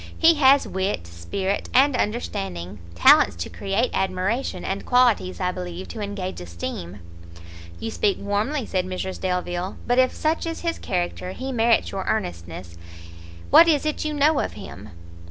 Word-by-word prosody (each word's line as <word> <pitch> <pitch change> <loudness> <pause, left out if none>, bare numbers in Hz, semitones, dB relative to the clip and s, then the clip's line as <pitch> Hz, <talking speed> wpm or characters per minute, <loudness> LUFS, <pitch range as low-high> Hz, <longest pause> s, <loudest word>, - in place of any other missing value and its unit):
he 330 0 +6
has 280 -2 +5
wit, 190 - -2
spirit, 85 - -3
and 270 +1 +5
understanding, 95 - -3 0.2
talents 85 - +6
to 85 - -5
create 200 +5 -1
admiration, 190 +7 -1
and 195 +1 -3
qualities, 245 -7 +2
I 180 -1 0
believe, 180 0 -6
to 225 - -6
engage 200 - -4
esteem!" 85 +2 -6 0.8
"You 225 - -4
speak 205 -2 +1
warmly," 215 +7 -1
said 185 -2 -1
Mrs 185 0 -5
Delvile; 180 0 -2
"but 245 +1 +2
if 255 0 +4
such 320 +2 -1
is 330 - -4
his 335 -1 -2
character, 180 0 -3
he 265 +5 -5
merits 230 -1 +2
your 195 -1 -4
earnestness. 85 - -4 0.7
What 335 - +9
is 305 -3 +2
it 305 - -1
you 305 - -2
know 295 0 +3
of - - -2
him?" 90 -8 -10
195 Hz, 155 wpm, -23 LUFS, 175-255 Hz, 0.8 s, What